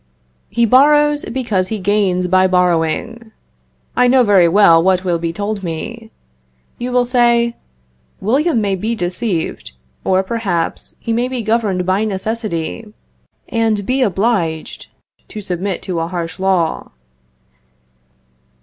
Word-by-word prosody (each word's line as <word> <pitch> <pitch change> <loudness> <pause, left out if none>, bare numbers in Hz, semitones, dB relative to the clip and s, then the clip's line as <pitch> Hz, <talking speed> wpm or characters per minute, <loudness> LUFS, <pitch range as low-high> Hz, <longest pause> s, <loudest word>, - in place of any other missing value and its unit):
He 235 - +2
borrows, 295 +4 +4
because 220 -7 -1
he 220 - -3
gains 190 -2 +1
by 185 +1 +3
borrowing. 180 +6 0 0.6
I 250 - +4
know 255 0 +5
very 195 -6 +5
well 170 -2 +5
what 185 +1 +2
will 175 -2 0
be 165 0 -2
told 205 +3 -4
me. 220 +7 -6 0.7
You 245 +1 -3
will 250 0 +2
say, 235 -1 +2 0.6
William 270 - +1
may 200 -2 0
be 220 +5 -2
deceived, 175 - -3 0.3
or, 190 0 +2
perhaps, 190 -6 -3
he 230 - -3
may 240 +2 0
be 255 -2 -4
governed 210 -5 0
by 190 +3 +1
necessity, 215 -1 -4 0.6
and 225 -3 0
be 260 +4 0
obliged 195 -7 -1 0.4
to 215 - -8
submit 190 -1 -3
to 180 -3 -3
a 165 - -2
harsh 170 -1 -5
law. 185 -4 0
205 Hz, 130 wpm, -17 LUFS, 180-235 Hz, 0.7 s, know